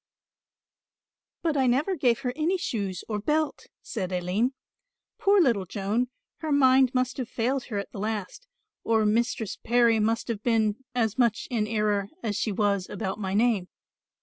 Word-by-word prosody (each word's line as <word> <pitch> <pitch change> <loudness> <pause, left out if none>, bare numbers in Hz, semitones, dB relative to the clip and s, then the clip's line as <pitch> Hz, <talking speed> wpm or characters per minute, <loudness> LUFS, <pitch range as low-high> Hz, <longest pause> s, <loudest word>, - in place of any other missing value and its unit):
Named. - - -66
"But - - +2
I 260 - +3
never 285 +10 +2
gave 250 -5 +2
her 250 -2 -2
any 330 +5 +1
shoes 200 - -3
or 210 -2 -2
belt," 300 +6 -1 0.2
said 190 -6 -4
Aline. 185 +8 0 0.6
"Poor 400 0 +4
little 230 - +2
Joan, 210 +7 -1 0.3
her 315 -1 -4
mind 260 -2 +5
must 255 0 0
have 250 -3 -4
failed 250 +3 -1
her 215 - -4
at 200 - -4
the - - -7
last, 215 - -4 0.4
or 220 -1 +2
Mistress 225 -1 0
Parry 235 -1 +4
must 225 +2 0
have 225 -4 -3
been 220 -3 +2 0.2
as 225 -1 0
much 235 -3 +2
in 220 -3 0
error 210 -2 0
as 215 -3 -1
she 210 +2 -1
was 200 -2 0
about 200 -1 -4
my 195 -1 -2
name. 215 -4 +2
225 Hz, 170 wpm, -27 LUFS, 205-255 Hz, 0.6 s, mind